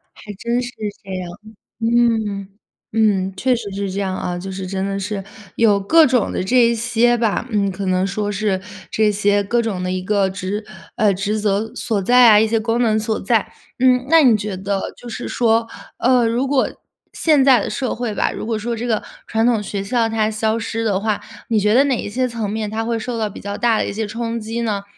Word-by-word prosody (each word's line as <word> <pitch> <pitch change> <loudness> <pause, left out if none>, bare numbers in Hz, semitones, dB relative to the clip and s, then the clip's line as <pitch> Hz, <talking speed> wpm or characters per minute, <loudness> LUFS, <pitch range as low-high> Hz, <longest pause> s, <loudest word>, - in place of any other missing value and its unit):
还 210 - -10
真 235 +3 -1
是 245 - -5 0.3
这 195 - -9
样， 180 -2 -5 0.5
嗯。 225 -4 +1 0.5
嗯， 200 -4 +2
确 255 +4 +2
实 220 -4 -6
是 200 0 -3
这 195 +2 -3
样 190 -1 -2
啊， 175 0 -3
就 190 +2 -6
是 190 0 -5
真 190 0 -2
的 195 0 -2
是 195 0 -4 0.3
有 210 -3 +4
各 320 +11 +5
种 250 -5 +2
的 - - -2
这 245 +7 +1
一 235 - +1
些 240 +1 +2
吧， 230 +1 0
嗯， 200 -3 0
可 195 +1 -5
能 185 0 +1
说 205 +1 -2
是 205 -1 -1 0.3
这 215 -1 +2
些 205 0 +2
各 235 +4 +1
种 210 -5 -3
的 180 - -2
一 185 0 -2
个 200 0 +1
职 195 +3 -4 0.3
呃， 210 -2 +3
职 205 +3 -2
责 210 +1 0
所 210 -3 -2
在 245 +4 +6
啊， 210 - +7
一 215 - +5
些 225 +1 +1
功 230 +2 0
能 220 -2 +2
所 220 0 -1
在。 220 +2 0 0.3
嗯， 250 0 +3
那 325 0 +6
你 245 -5 +6
觉 205 -2 -3
得 195 +1 -3
就 245 - -11
是 240 +1 -6
说， 230 -1 +1 0.3
呃， 245 -1 +3
如 235 +4 0
果 275 -1 +1 0.4
现 300 -5 +3
在 260 -5 +6
的 - - -3
社 260 -3 -2
会 235 -2 -3
吧， - - 0
如 - - -6
果 220 -1 -2
说 235 +2 -3
这 230 +2 -4
个 225 -3 0 0.2
传 225 +1 0
统 230 -3 +2
学 200 -1 -4
校 225 +3 0
它 220 -1 +1
消 220 +1 0
失 225 0 -3
的 205 -4 +1
话， 215 0 -1 0.3
你 225 - +1
觉 210 +1 +3
得 265 +4 +5
哪 275 -2 +1
一 - - -4
些 255 +4 0
层 230 -4 -4
面， 215 0 -3
它 220 +1 -2
会 230 0 -1
受 235 +1 -4
到 220 -2 -1
比 - - -10
较 200 0 -5
大 235 -2 +2
的 - - 0
一 - - -4
些 220 +2 -2
冲 230 +2 -3
击 225 +1 -4
呢？ 205 -3 -2
220 Hz, 245 characters per minute, -19 LUFS, 200-235 Hz, 0.5 s, 啊